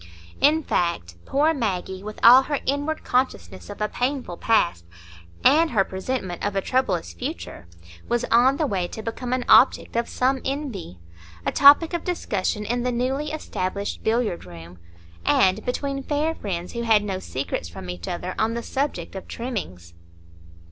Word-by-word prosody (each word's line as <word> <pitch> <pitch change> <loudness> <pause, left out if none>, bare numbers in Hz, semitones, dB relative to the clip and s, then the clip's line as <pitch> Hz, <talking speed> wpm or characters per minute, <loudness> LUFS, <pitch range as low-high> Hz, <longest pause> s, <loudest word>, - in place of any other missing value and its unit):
In 310 +2 +4
fact, 170 - -1
poor 300 +4 +2
Maggie, 190 - -3
with 210 +1 -8
all 250 +3 +10
her 285 +2 -2
inward 290 +3 -1
consciousness 250 -7 -2
of 205 - -8
a 210 - +2
painful 250 -5 -2
past 175 - +1 0.6
and 320 +2 +5
her 210 -8 +3
presentiment 190 -2 -4
of 205 -1 -1
a - - +2
troublous 190 - -1
future, 85 0 -6 0.4
was 240 0 +1
on 255 +4 +5
the 310 - +1
way 190 -8 -1
to 220 - -8
become 240 +2 -5
an 255 -1 0
object 260 - +5
of 235 0 0
some 260 +1 0
envy,—a 85 - -6
topic 290 +5 +6
of 345 - -2
discussion 210 - -2
in 245 +3 -1
the 250 +1 0
newly 265 +5 -1
established 200 -9 -4
billiard 220 -5 0
room, 85 0 -12 0.4
and 190 - +3
between 275 +2 -2
fair 300 +3 -1
friends 180 - -5
who 235 - -3
had 220 -3 +3
no 195 -2 -3
secrets 130 - -4
from 85 - -9
each 90 -1 -6
other 180 +1 -4
on 225 +1 +1
the 235 - -4
subject 280 +4 -3
of 190 - -8
trimmings. 95 - -6
225 Hz, 160 wpm, -24 LUFS, 180-265 Hz, 0.6 s, all